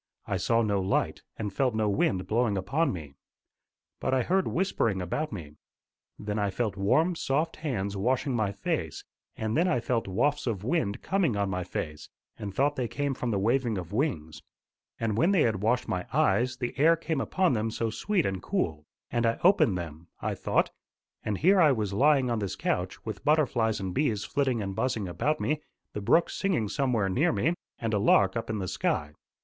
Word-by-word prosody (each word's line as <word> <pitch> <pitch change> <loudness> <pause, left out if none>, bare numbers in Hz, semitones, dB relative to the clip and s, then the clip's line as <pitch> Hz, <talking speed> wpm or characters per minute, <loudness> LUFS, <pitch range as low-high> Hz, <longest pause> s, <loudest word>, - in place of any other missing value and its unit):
I 100 - -1
saw 115 +5 +2
no 100 -2 +1
light, 95 +1 0 0.2
and 105 -3 -4
felt 125 0 +1
no 110 -1 +1
wind 100 -2 +1
blowing 110 -2 +1
upon 135 - +1
me. 75 -6 -7 0.9
But 130 - 0
I 130 - +2
heard 190 +5 +1
whispering 135 - 0
about 120 - -2
me. 75 -8 -8 0.6
Then 105 0 -3
I 100 -1 +1
felt 110 +1 -2
warm, 155 - +2
soft 160 +2 -1
hands 100 -10 -2
washing 125 +6 0
my 110 -4 +1
face, 100 -1 -3 0.3
and 110 0 -2
then 170 +4 +3
I 125 - +2
felt 120 -2 -1
wafts 130 +10 0
of 105 -5 -2
wind 120 -6 -1
coming 175 - +1
on 100 -1 0
my 90 0 -2
face, 75 -4 -5 0.3
and 100 -2 -4
thought 140 +7 +1
they 125 -2 0
came 140 +3 -2
from 125 -1 -3
the 105 - +1
waving 115 +2 +1
of 90 +1 -6
wings. 105 - -2 0.6
And 110 -2 0
when 175 +8 +4
they 180 - +4
had 110 -5 0
washed 120 +4 +1
my 90 -1 -2
eyes, 120 +7 +2
the 125 -1 -3
air 165 +3 +6
came 160 -3 -2
upon 185 -1 +1
them 110 -1 0
so 110 0 -2
sweet 185 - 0
and 95 -1 -2
cool! 80 - -2 0.2
and 120 - +1
I 115 - +1
opened 170 - +5
them, 85 -1 -7
I - - -2
thought, - - 0 0.5
and 105 -2 -1
here 185 - +5
I 155 -3 +6
was 105 -5 -2
lying 135 +2 +3
on 115 - 0
this 100 -3 -3
couch, 90 +1 -2
with 110 - -5
butterflies 125 -8 +2
and 95 -2 -3
bees 110 -7 0
flitting 130 -6 0
and 95 -1 -4
buzzing 115 -4 -1
about 145 - -1
me, 150 +1 -1 0.3
the 105 - -4
brook 165 +12 +3
singing 170 - 0
somewhere 115 -2 +1
near 145 - +2
me, 165 - +1 0.2
and 115 -1 -2
a 105 - +2
lark 100 -1 +4
up 115 - -3
in 110 - -1
the 95 -2 -3
sky. 75 -3 -1
115 Hz, 200 wpm, -28 LUFS, 100-140 Hz, 0.9 s, air